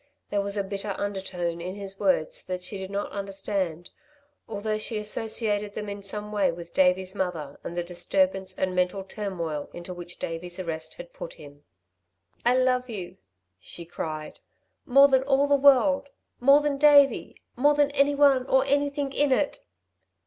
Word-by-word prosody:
There 205 -1 +1
was 200 +1 -3
a 200 - +1
bitter 195 0 -4
undertone 190 -4 -3
in 180 +2 -5
his 195 -1 -8
words 185 -6 +1
that 180 0 -4
she 195 +2 -5
did 190 0 -6
not 200 +1 -3
understand, 195 -4 -3 0.6
although 215 0 -2
she 220 +1 -3
associated 210 -1 -2
them 210 -1 -4
in 200 0 -6
some 210 +1 -6
way 200 -4 +2
with 170 0 -10
Davey's 185 0 +2
mother 160 -7 -3
and 170 - -6
the 175 - 0
disturbance 190 +2 0
and 185 -1 0
mental 180 +2 0
turmoil 180 -7 -4
into 175 +1 -7
which 175 0 -8
Davey's 175 +2 -5
arrest 160 -3 -4
had - - -11
put - - -7
him. 145 -1 -14 0.8
"I 245 +2 +4
love 255 0 +2
you," 195 -6 -6 0.4
she 170 - -8
cried, 155 -2 -6 0.5
"more 275 +2 +7
than 265 -2 +3
all 275 +1 +3
the 285 0 +4
world 280 0 +4 0.3
more 275 +4 +6
than 290 -2 -1
Davey, 290 -1 +5 0.2
more 290 +4 +4
than 290 -1 +3
anyone 280 -2 +4
or 265 0 +3
anything 285 0 0
in 290 0 +2
it!" 280 +2 +1
200 Hz, 165 wpm, -26 LUFS, 180-265 Hz, 0.8 s, more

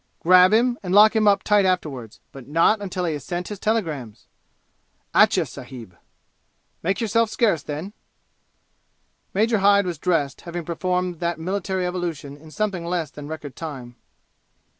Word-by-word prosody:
"Grab 185 +2 +6
him, 240 +2 +2
and 185 0 -2
lock 215 +2 +7
him 215 -1 +3
up 200 -1 +4
tight 210 -1 +3
afterward 150 - -2
but 135 -3 -12
not 165 +8 +3
until 185 -2 -3
he 165 - -1
has 145 -3 -6
sent 175 +3 -4
his 205 -2 -6
telegrams!' 160 - -2 0.9
"Atcha, - - +4
sahib." 115 -9 -11 0.9
"Make 190 +4 -1
yourself 230 0 +1
scarce, 210 - +1
then!" 155 +9 -6 1.4
Major 220 +2 +2
Hyde 200 0 +4
was 175 -4 -4
dressed, 155 -7 0
having 175 -1 -6
performed 180 0 -2
that 170 0 -1
military 190 +1 -2
evolution 170 -6 -4
in 155 +2 -15
something 195 0 -2
less 170 -4 -2
than 145 -1 -9
record 150 -3 -7
time. 130 -7 -8
180 Hz, 150 wpm, -23 LUFS, 155-200 Hz, 1.4 s, lock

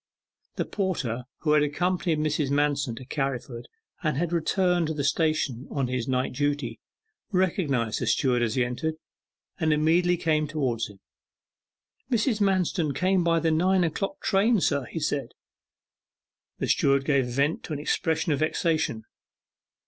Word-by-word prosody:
The - - -1
porter 135 - -2 0.2
who 150 - +1
had 150 0 +5
accompanied 170 +3 0
Mrs. 150 -2 0
Manston 140 -3 +1
to 130 - -9
Carriford, 130 -3 -3 0.3
and 155 -5 0
had 170 +2 -1
returned 175 0 +1
to 160 - -3
the 145 - -2
station 145 -5 0
on 135 -3 -1
his 125 -2 -2
night 130 -1 0
duty, 145 -4 -1 0.5
recognized 160 - 0
the - - -1
steward 125 -3 +2
as 115 -2 0
he 125 -2 +2
entered, 155 +6 -3 0.6
and 160 -2 +2
immediately 170 +4 +3
came 155 -2 +1
towards 130 -8 -1
him. 100 -2 -16 1.1
'Mrs. 225 -2 +1
Manston 180 -6 +1
came 185 +2 +2
by 165 -1 +3
the 165 0 +1
nine 180 +3 +3
o'clock 195 +4 -2
train, 210 +3 +3
sir,' 140 -6 +1
he 165 - -5
said. 145 -2 -2 1.2
The - - -2
steward 140 -1 +2
gave 140 -3 +2
vent 140 +6 0
to 155 - -5
an 145 - -3
expression 160 +2 0
of 145 - +1
vexation. 155 -7 0
150 Hz, 150 wpm, -26 LUFS, 135-170 Hz, 1.2 s, had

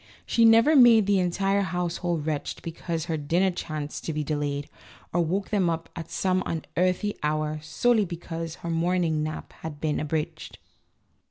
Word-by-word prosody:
She 230 - +3
never 230 +7 +6
made 235 -5 +7
the 200 -1 +3
entire 195 +3 +1
household 175 -3 -2
wretched 155 -2 -3
be 165 - -4
cause 165 -1 -4
her 165 -2 -2
dinner 170 +6 +1
chanced 155 -4 -5
to 160 - -2
be 150 0 -1
delayed, 145 -1 -2 0.5
or 175 - +3
woke 190 +5 -1
them 195 -5 +2
up 165 0 -3
at 165 -1 -7
some 185 -1 0
unearthly 180 +5 -1
hour 155 0 -1
solely 215 +8 +2
because 165 -2 -6
her 170 - -1
morning 165 -1 +1
nap 155 0 -5
had 150 -2 -6
been 155 -1 -1
abridged. 155 0 -3
170 Hz, 165 wpm, -26 LUFS, 155-185 Hz, 0.5 s, made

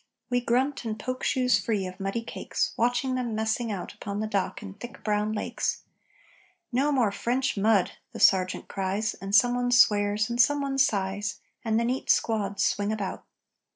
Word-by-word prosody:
We 245 0 +2
grunt 255 +4 0
and 220 -2 -3
poke 255 +3 -4
shoes 250 -2 +2
free 210 -4 0
of 185 +1 -8
muddy 195 +4 -2
cakes, - - -3
Watching 245 +3 +1
them 245 -3 -2
messing 220 +1 -1
out 195 -3 -5
Upon 200 0 -5
the 215 - -1
dock 205 -1 -2
in 200 -2 -8
thick 240 +4 -10
brown 210 0 0
lakes 215 - -2 0.9
"No 270 +4 +2
more 245 -7 +2
French 255 +6 -1
mud!" 205 -2 +3 0.2
the - - -8
sergeant 185 -1 +3
cries, 195 +2 -2
And 195 +1 -3
someone 245 +3 +4
swears, 210 -3 +4
and 240 +1 +2
someone 280 +1 +1
sighs, 205 -5 0 0.2
And 225 -1 +1
the 235 - 0
neat 255 +2 -2
squads 200 -3 +1
swing 205 +1 0
about. 205 -3 -4
220 Hz, 170 wpm, -27 LUFS, 205-245 Hz, 0.9 s, someone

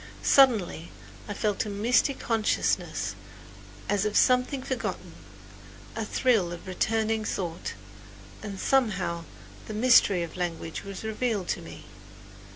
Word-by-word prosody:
Suddenly 220 - +4 0.4
I 205 - -5
felt 210 -2 0
a 215 - -6
misty 235 +7 +2
consciousness 225 -4 0 0.7
as 205 -1 +1
of 210 -1 0
something 255 +1 +3
forgotten 210 -9 -4 0.8
a 225 - -2
thrill 215 -5 +1
of 175 - -8
returning 220 +3 0
thought; 175 -5 -4 0.7
and 200 -2 -6
somehow 190 -10 +1 0.4
the 215 - -5
mystery 215 -6 +5
of 165 - -8
language 170 -2 -4
was 195 -1 -7
revealed 220 -3 -2
to - - -1
me. - - -11
210 Hz, 120 wpm, -27 LUFS, 185-230 Hz, 0.8 s, mystery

